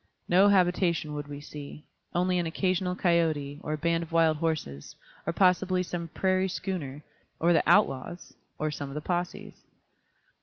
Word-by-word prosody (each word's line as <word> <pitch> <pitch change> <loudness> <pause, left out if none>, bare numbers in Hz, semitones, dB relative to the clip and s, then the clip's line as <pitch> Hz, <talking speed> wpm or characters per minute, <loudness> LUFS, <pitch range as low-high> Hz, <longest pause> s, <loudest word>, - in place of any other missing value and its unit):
No 190 +3 +5
habitation 175 -5 +2
would 145 -1 -5
we 145 -1 -7
see; 145 0 -10 0.3
only 180 +1 +2
an 170 - -1
occasional 180 +2 0
coyôte, 160 -6 +1
or 155 - -3
a - - -2
band 170 +2 +1
of 165 0 -7
wild 165 -2 +3
horses, 155 - -3 0.3
or - - +2
possibly 185 0 +3
some 175 -1 -5
prairie 185 +3 +1
schooner, 150 -7 -4 0.4
or 170 +2 +4
the 165 - +4
outlaws, 175 -3 +1 0.2
or 155 0 -1
some 145 -1 -5
of 140 - -8
the 150 - -6
possès. 175 0 -3
170 Hz, 160 wpm, -28 LUFS, 150-180 Hz, 0.4 s, No